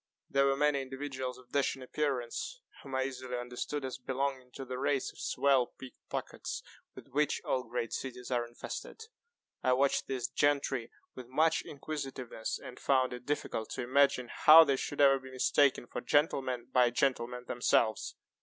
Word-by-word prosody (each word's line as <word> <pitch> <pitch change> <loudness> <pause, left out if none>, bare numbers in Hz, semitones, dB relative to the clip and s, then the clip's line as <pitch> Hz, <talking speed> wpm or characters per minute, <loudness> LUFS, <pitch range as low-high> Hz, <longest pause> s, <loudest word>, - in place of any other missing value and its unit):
There 140 0 +4
were 135 0 +2
many 145 -1 +2
individuals 130 -1 -5
of 130 -1 -18
dashing 140 -1 0
appearance, 140 - -2 0.2
whom 135 -1 -7
I 130 - +2
easily 130 -1 -4
understood 125 +4 -4
as 130 0 -5
belonging 130 0 -2
to 135 - -7
the 125 0 -5
race 140 -1 0
of - - -17
swell 135 -2 +2
pick 130 -1 -10 0.2
pockets, - - -4 0.3
with - - -12
which 150 +3 +1
all 130 - +1
great 115 0 -3
cities 125 -1 -5
are 120 -1 0
infested. 120 - -7 0.6
I 130 - +3
watched 135 +2 +2
these 130 -3 -2
gentry 140 -4 +1 0.2
with 130 -2 -9
much 155 +5 +2
inquisitiveness, 135 -6 -5
and 125 - -10
found 130 -2 +2
it 125 0 -9
difficult 130 -6 -2
to - - -3
imagine 125 -1 +3
how 160 +2 +9
they 140 -3 +2
should 145 +2 -2
ever 135 -1 +6
be 130 0 -11
mistaken 130 0 +2
for 125 - -5
gentlemen 130 -3 +1
by 125 -2 +5
gentlemen 125 -1 0
themselves. 115 -3 +1
130 Hz, 165 wpm, -32 LUFS, 125-140 Hz, 0.6 s, how